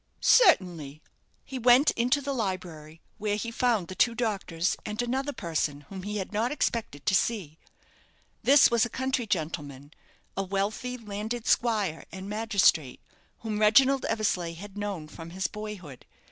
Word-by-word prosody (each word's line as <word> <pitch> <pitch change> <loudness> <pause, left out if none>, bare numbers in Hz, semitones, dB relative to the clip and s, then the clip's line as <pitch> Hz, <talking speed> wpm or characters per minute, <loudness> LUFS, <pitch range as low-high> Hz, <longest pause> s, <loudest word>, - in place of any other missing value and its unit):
"Certainly." 175 - +4 0.5
He 265 -1 -6
went 250 +4 +6
into 250 +5 +1
the 280 0 -3
library, 175 - -5 0.2
where 210 -1 0
he 230 +2 -4
found 230 -6 +1
the 185 - -7
two 230 +5 +2
doctors, 195 -7 -1
and 210 0 -6
another 260 +4 -1
person, 155 - -2
whom 190 -1 -7
he 210 +2 -4
had 195 +1 -5
not 225 +4 0
expected 225 - -2
to - - +2
see. 190 -7 0 0.8
This 275 -1 +6
was 235 -1 +3
a 240 - 0
country 260 -1 -2
gentleman 150 -6 -4 0.4
a 195 - -1
wealthy 200 +6 -2
landed 220 +1 -5
squire 210 -9 +1
and 190 0 -8
magistrate 200 - +2 0.4
whom 215 -2 -3
Reginald 265 +6 +5
Eversleigh 195 -6 -1
had 195 +4 -10
known 200 -6 -4
from 165 +1 -10
his 185 +2 -4
boyhood. 205 -11 -7
210 Hz, 150 wpm, -28 LUFS, 170-235 Hz, 0.8 s, went